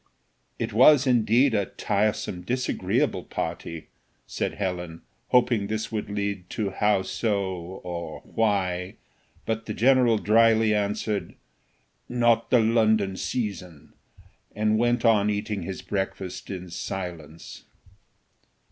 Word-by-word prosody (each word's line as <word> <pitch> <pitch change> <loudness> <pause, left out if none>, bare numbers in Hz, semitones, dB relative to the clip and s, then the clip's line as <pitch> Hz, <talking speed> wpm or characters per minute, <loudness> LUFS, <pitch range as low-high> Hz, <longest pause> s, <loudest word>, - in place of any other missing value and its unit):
"It 115 -1 -3
was, 135 +4 +6
indeed, 125 +1 +3
a 100 -3 +1
tiresome, 105 -4 -1
disagreeable 125 +7 -1
party," 80 -1 -5 0.4
said - - -3
Helen, 90 -4 -4 0.2
hoping 120 -4 +2
this 110 +1 -3
would 110 -2 -3
lead 100 -3 -3
to 105 -3 -1
how 105 0 +2
so? 100 0 -1 0.4
or 85 -1 -6
why? 95 -4 -1 0.5
but 115 0 -3
the 105 - -4
general 125 -2 +4
drily 110 0 +4
answered, 105 0 -2 0.7
"Not 120 -2 +2
the 125 - +5
London 110 -3 +2
season," 90 - -5 0.6
and 110 +1 +1
went 120 0 +1
on 105 -2 +4
eating 105 -1 -2
his 95 +2 -6
breakfast 95 -2 -4
in 90 -2 -6
silence. 85 -3 -7
105 Hz, 110 wpm, -25 LUFS, 95-115 Hz, 0.7 s, was